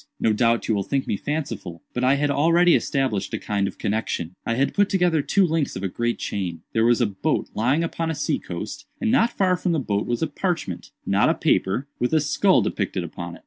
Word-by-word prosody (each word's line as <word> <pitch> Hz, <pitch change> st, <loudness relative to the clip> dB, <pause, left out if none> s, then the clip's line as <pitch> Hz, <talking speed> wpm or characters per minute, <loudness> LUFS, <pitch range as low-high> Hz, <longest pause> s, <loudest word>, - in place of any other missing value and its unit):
"No 110 Hz, -, +2 dB
doubt 115 Hz, +1 st, +2 dB
you 115 Hz, -, +2 dB
will 100 Hz, -, +1 dB
think 135 Hz, +7 st, -1 dB
me -, -, -1 dB
fanciful—but 125 Hz, -, -4 dB
I 130 Hz, +2 st, +4 dB
had 145 Hz, 0 st, +1 dB
already 170 Hz, +5 st, +4 dB
established 130 Hz, -9 st, 0 dB
a -, -, -1 dB
kind 100 Hz, -2 st, -1 dB
of -, -, -7 dB
connexion. 100 Hz, -5 st, -2 dB
I 115 Hz, -, +1 dB
had 135 Hz, +3 st, +1 dB
put 205 Hz, 0 st, +3 dB
together 175 Hz, -5 st, +2 dB
two 195 Hz, +6 st, +3 dB
links 160 Hz, -3 st, -1 dB
of 95 Hz, -, -5 dB
a -, -, +1 dB
great 120 Hz, +5 st, -1 dB
chain. 90 Hz, -5 st, -4 dB
There 110 Hz, -, +2 dB
was 120 Hz, +1 st, +3 dB
a -, -, +4 dB
boat 100 Hz, -3 st, -1 dB
lying 130 Hz, +9 st, +1 dB
upon 165 Hz, 0 st, -2 dB
a 160 Hz, -, -2 dB
sea -, -, -1 dB
coast, -, -, -7 dB
and 230 Hz, -, +1 dB
not 235 Hz, -2 st, +4 dB
far 185 Hz, -2 st, +3 dB
from 180 Hz, -1 st, -1 dB
the 160 Hz, -, +1 dB
boat 105 Hz, -6 st, -1 dB
was 120 Hz, +5 st, -1 dB
a -, -, +1 dB
parchment—not 175 Hz, +4 st, -1 dB
a -, -, +2 dB
paper—with 125 Hz, +7 st, 0 dB
a -, -, +5 dB
skull 170 Hz, +6 st, +3 dB
depicted 95 Hz, -2 st, -2 dB
upon 85 Hz, 0 st, -7 dB
it. -, -, -14 dB
130 Hz, 225 wpm, -23 LUFS, 105-165 Hz, -, a